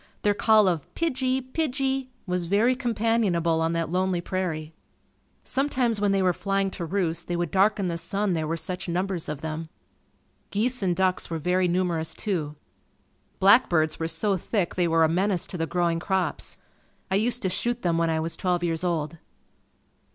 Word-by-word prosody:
Their 205 - +4
call 215 0 +4
of 170 -5 -1
"pigie! 265 -5 0
pigie!" 270 -3 -1 0.2
was 180 -2 -2
very 220 +7 +3
companionable 220 - +1
on 165 +1 +1
that 165 -1 -1
lonely 185 0 +1
prairie. 170 -4 -3 0.7
Sometimes 255 -6 0
when 205 -1 +3
they 195 -1 +2
were 180 -1 +3
flying 195 +1 -1
to 175 - -5
roost 170 -2 -1
they 175 - -1
would 175 -2 -2
darken 195 0 +3
the 170 -1 -2
sun, 195 +3 -1
there 160 -2 -1
were 165 +1 -1
such 180 +2 -4
numbers 180 0 -2
of 150 -1 -4
them. 160 0 -5 0.8
Geese 240 +4 0
and 180 -3 +1
ducks 185 0 0
were 165 - -2
very 180 +3 +1
numerous, 175 -3 0
too. 160 -8 -2 0.8
Black 200 +6 +6
birds 155 -3 +1
were 165 - -1
so 180 +5 +1
thick 185 0 -1
they 180 -2 +1
were 165 0 +3
a - - +5
menace 180 +2 +1
to - - -8
the 165 - 0
growing 170 -1 0
crops. 190 +1 -1 0.5
I - - +3
used 235 +4 +1
to 190 - +1
shoot 240 +5 -1
them 170 -2 +1
when 165 -1 +2
I 160 0 +1
was 165 +1 -3
twelve 180 -1 0
years 165 0 -1
old. 165 -2 -2
180 Hz, 180 wpm, -26 LUFS, 165-205 Hz, 0.8 s, Black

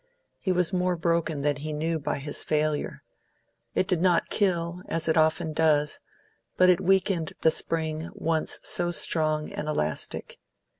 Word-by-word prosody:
He 190 - -1
was 180 0 +1
more 180 0 +1
broken 165 -3 0
than 145 0 0
he 155 +2 -5
knew 160 +2 -1
by 140 - -2
his 145 +1 0
failure; 150 -1 -1 0.7
it 185 - +1
did 180 -3 0
not 175 -2 +2
kill, 175 -3 0
as 165 0 -2
it 160 - +2
often 160 0 +2
does, 150 -2 +2 0.6
but 185 0 +6
it 175 - +1
weakened 190 -3 +1
the 160 - +5
spring 160 0 -2
once 165 -5 0
so 175 0 +2
strong 155 -2 +1
and 150 - -5
elastic. 80 - -3
160 Hz, 155 wpm, -26 LUFS, 155-175 Hz, 0.7 s, but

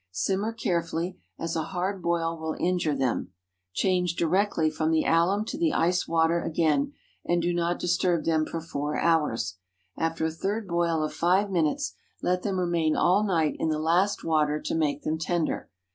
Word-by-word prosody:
Simmer 190 - -1
carefully, 170 -4 -2 0.2
as 165 0 -3
a 160 - +1
hard 185 +3 -3
boil 165 -1 0
will 160 -1 -4
injure 175 -4 +1
them. 130 -8 -1 0.4
Change 180 - +1
directly 170 -1 +2
from 155 0 -1
the 160 -1 +3
alum 185 +6 +3
to 290 +7 -5
the 330 -3 +2
ice 180 +2 +1
water 165 +1 +2
again, 165 - +1 0.3
and 175 0 +1
do 175 +1 0
not 175 0 0
disturb 175 -1 +1
them 160 -1 +2
for 165 - -4
four 150 -2 -3
hours. 150 - +1 0.4
After 165 0 -1
a 160 - 0
third 200 +6 -3
boil 170 -2 +1
of 155 - -3
five 190 +4 +2
minutes, 165 -5 0 0.3
let 180 0 0
them 190 -1 -1
remain 170 -3 +1
all 190 +4 +3
night 165 -7 +1
in 160 - 0
the 155 - 0
last 175 +6 +1
water 150 -2 +1
to - - -3
make 150 -3 0
them 160 +1 -1
tender. 165 0 -1
170 Hz, 175 wpm, -27 LUFS, 160-180 Hz, 0.4 s, the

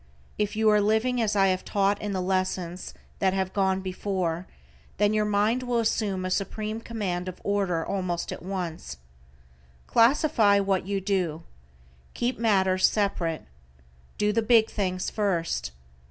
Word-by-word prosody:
If 210 0 0
you 220 0 +2
are 210 0 +4
living 220 +4 +1
as 215 -2 0
I 195 -1 +4
have 185 0 -1
taught 200 0 +1
in 210 - -3
the 185 -2 -2
lessons 185 -1 -2 0.2
that 190 -1 +2
have 190 -1 -1
gone 190 -1 +1
before, 185 -2 -3 0.5
then 205 +1 +3
your 215 0 +2
mind 210 +4 +1
will 245 -1 -1
assume 210 -4 0
a 185 - -3
supreme 215 +3 -2
command 190 -6 -3
of 185 - -7
order 195 -5 0
almost 185 -3 -2
at - - -6
once. 175 - -5 0.9
Classify 230 -4 +4
what 195 -2 0
you 200 -1 -1
do. 180 -5 -1 0.7
Keep 240 0 -1
matters 190 -4 +3
separate. 180 -6 -1 0.7
Do 210 0 +1
the 230 - +2
big 225 -1 +4
things 185 -3 -2
first. 170 - -1
195 Hz, 150 wpm, -26 LUFS, 185-215 Hz, 0.9 s, are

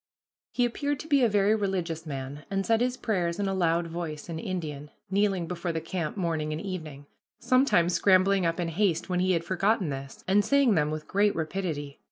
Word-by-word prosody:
He 245 - +2
appeared 285 +4 -2
to 315 - -10
be 285 -4 +4
a 235 - +4
very 205 0 +3
religious 180 -6 -2
man, 140 +1 -6
and 195 0 -1
said 225 0 +2
his 250 +1 0
prayers 180 -8 -1
in 200 - -1
a 195 - 0
loud 170 -2 +1
voice, 165 -2 -6
in 160 -1 -4
Indian, 155 -6 -5 0.2
kneeling 195 -3 +1
before 170 0 -3
the 165 - -2
camp, 165 +1 -4
morning 160 -4 -1
and 155 - -3
evening 160 -7 -6 0.3
sometimes 255 -10 +3
scrambling 190 0 +4
up 165 +1 0
in 170 -1 -1
haste 175 0 0
when 180 -1 0
he 185 +1 +2
had 165 -1 0
forgotten 190 +1 +1
this, 135 -1 -7
and 200 +2 +4
saying 280 -3 +4
them 150 -4 +2
with 155 0 -5
great 205 +1 +2
rapidity. 160 -4 -3
180 Hz, 205 wpm, -28 LUFS, 160-200 Hz, 0.3 s, be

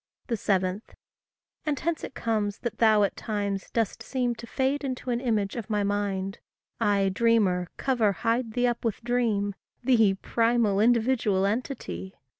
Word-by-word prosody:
7. 190 -2 0 0.8
And 295 -3 -1
hence 330 +2 -2
it - - -7
comes 210 -3 -1
that 235 -3 -4
thou 215 -2 +5
at 200 - 0
times 200 -3 -3
dost 225 -4 -1
seem 250 -2 -1
To 235 0 -10
fade 270 +4 0
into 255 -2 -3
an 240 0 0
image 215 -6 0
of 230 -3 -5
my 210 -1 +1
mind; 200 -1 -1 0.4
I, 200 -3 +2
dreamer, 195 -4 +2
cover, 240 -6 +2
hide 230 +3 -1
thee 245 +1 +1
up 240 -1 0
with 230 0 -2
dream, 225 -4 +1 0.3
Thee, 225 -6 +4
primal, 230 -1 +1
individual 225 -4 +3
entity! 195 - -3
220 Hz, 150 wpm, -27 LUFS, 200-240 Hz, 0.8 s, thou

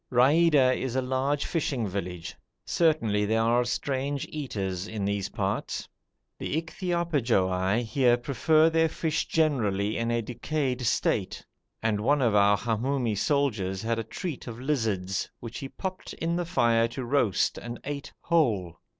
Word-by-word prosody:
Raida 135 +1 +5
is 130 -2 -3
a 130 - +2
large 135 +3 0
fishing 135 -9 -1
village. 90 -1 -5 0.3
Certainly 130 -8 +2
there 110 +1 +2
are 120 +2 +3
strange 135 +2 -2
eaters 100 - -4
in 105 -3 -3
these 100 -1 -1
parts. - - -2 0.5
The 155 - -1
Ichthyophagoi 130 - 0
here 120 +1 +3
prefer 155 +5 +3
their 160 0 +3
fish 160 0 -1
generally 110 -10 +1
in 115 0 -1
a 120 0 0
decayed 130 +2 -2
state; 100 -3 0 0.4
and 110 -2 +1
one 140 +4 +2
of 115 -3 +3
our 100 0 +5
Hamoumi 120 +1 -1
soldiers 105 -7 0
had 115 0 0
a - - -2
treat 140 - -6
of 115 0 -7
lizards, 110 -9 -1
which 115 0 -7
he 135 - -6
popped 185 +3 -6
in 165 +1 -2
the 175 0 -1
fire 115 -9 +3
to 125 +2 -6
roast 120 -7 +1
and 120 0 -7
ate 145 0 -5
whole. 105 - +1
120 Hz, 150 wpm, -27 LUFS, 105-145 Hz, 0.5 s, Raida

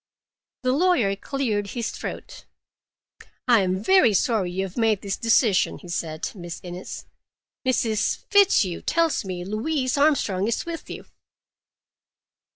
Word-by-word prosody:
The 255 - +2
lawyer 270 - +2
cleared 215 -3 -2
his 230 +3 -3
throat. - - -8 1.0
"I 235 -4 +5
am 185 +1 -1
very 370 - +5
sorry 210 -4 +1
you 185 +2 -2
have 190 -1 -7
made 225 -4 +1
this 195 -1 -2
decision," 230 -3 +2
he 180 - -13
said. 160 -2 -3
"Miss 175 -4 -8
Innes, 180 +1 -7 0.6
Mrs. 225 -4 0
Fitzhugh 365 - +4
tells 330 -5 +1
me 180 -2 -5
Louise 255 +6 -1
Armstrong 220 -10 +2
is 230 - -1
with 335 -1 -7
you." - - -8
215 Hz, 130 wpm, -24 LUFS, 190-265 Hz, 1.0 s, I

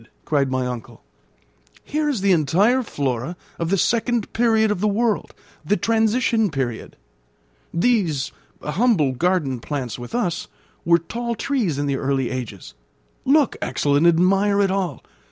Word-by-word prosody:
cried 140 -3 +1
my 130 -1 -1
uncle. 125 -3 -7 0.8
"Here 300 0 -1
is 255 -9 -1
the 200 0 +3
entire 185 - +3
flora 140 - -3 0.2
of 165 -1 -1
the 195 - +2
second 235 +2 0
period 225 -2 +3
of 210 - -1
the 210 - +1
world 215 +1 0 0.3
the 205 - +1
transition 225 -1 +2
period. 130 -6 -4 0.8
These, 170 - +1 0.3
humble 165 - +2
garden 150 -3 0
plants 125 -3 -4
with 120 - -7
us, 180 -9 -1 0.4
were 170 0 +5
tall 235 +8 -4
trees 225 - -1
in 145 - -1
the 140 -1 0
early 135 -2 -1
ages. 105 - -6 0.5
Look, 285 -1 +3
Axel, 145 -1 0
and 155 +4 +4
admire 195 +4 +3
it 195 -2 +3
all. 190 -2 -2
180 Hz, 145 wpm, -22 LUFS, 140-225 Hz, 0.8 s, were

